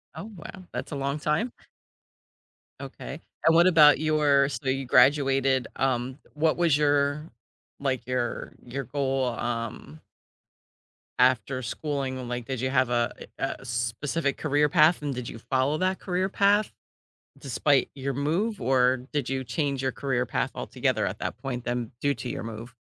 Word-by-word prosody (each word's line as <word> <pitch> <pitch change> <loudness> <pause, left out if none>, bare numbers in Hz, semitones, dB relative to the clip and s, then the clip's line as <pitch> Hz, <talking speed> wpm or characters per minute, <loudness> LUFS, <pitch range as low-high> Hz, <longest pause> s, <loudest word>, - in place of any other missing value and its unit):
Oh, 185 +8 -7
wow, 185 +3 -10
that's - - -5
a - - -3
long 140 +2 -2
time. 150 +12 0 1.3
Okay, - - -8 0.2
and 165 0 +6
what 170 +2 +6
about 150 -5 +7
your 150 -3 +3
so 140 -1 -3
you 135 0 -1
graduated, 135 0 +4
um, 130 0 -1 0.2
what 155 +1 +2
was 170 -4 +3
your, 145 +1 +1 0.5
like, 130 -3 -1
your 125 -1 -2
your 130 +2 -5
goal, 135 0 -1
um 115 -10 -4 1.2
after 130 +1 +3
schooling, 135 0 -3
um, 125 -2 -6
like, 125 -1 -4
did 130 -3 -4
you 130 - 0
have 130 -2 +2
a 120 -1 +1 0.2
eh 135 - -1
a - - -13
specific 130 +5 -2
career 150 -1 +2
path, 155 +2 +4
and 145 -2 -2
did 125 -1 -5
you - - -7
follow 130 +5 0
that 185 0 0
career 185 0 -1
path 200 +2 +3 0.7
despite 140 +1 +1
your 135 0 -3
move, 170 - -1
or 125 0 +2
did 145 -4 -1
you 135 0 -1
change 140 +1 -2
your 130 - 0
career 135 -3 -1
path - - -1
altogether - - -1
at - - -4
that - - -4
point 125 -3 -5
then 120 -2 -3
due 145 0 +2
to 125 - -6
your - - -4
move? 115 +2 -8
135 Hz, 165 wpm, -26 LUFS, 125-150 Hz, 1.3 s, about